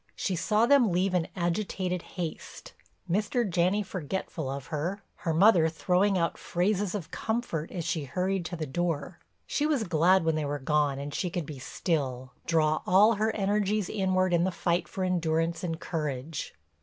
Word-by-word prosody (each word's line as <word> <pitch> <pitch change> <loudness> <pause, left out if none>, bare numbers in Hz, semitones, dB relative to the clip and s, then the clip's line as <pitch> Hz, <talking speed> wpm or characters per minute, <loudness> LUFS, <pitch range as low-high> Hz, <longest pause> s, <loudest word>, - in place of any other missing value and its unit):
She 190 - -1
saw 210 +7 +2
them 250 -5 +5
leave 185 +2 +1
in 175 -2 +1
agitated 180 0 -1
haste, 170 -3 -7 0.3
Mr. 210 +5 +1
Janney 185 +3 +2
forgetful 175 -5 -4
of 135 -1 -5
her, 175 +7 -2
her 165 - -2
mother 170 -1 +5
throwing 185 +4 +2
out 165 -1 0
phrases 195 +2 0
of 175 -6 -5
comfort 220 -9 -2
as 175 -4 -5
she 160 -3 -1
hurried 185 +6 -1
to 175 - -4
the 160 -2 -3
door. 165 +1 -2 0.3
She 300 - 0
was 290 -7 +1
glad 180 0 +3
when 160 - +3
they 155 0 -1
were 145 0 -2
gone 145 0 +1
and 140 +1 -5
she 180 - -1
could 175 -2 -3
be 140 -2 -8
still, 130 - -2
draw 155 -2 +2
all 205 +5 +6
her 215 +1 +1
energies 205 0 +1
inward 185 -3 +1
in 170 0 +3
the 185 - +2
fight 170 0 0
for 190 - -4
endurance 165 -2 0
and 165 -2 -2
courage. 150 -2 -4
175 Hz, 175 wpm, -28 LUFS, 160-195 Hz, 0.3 s, all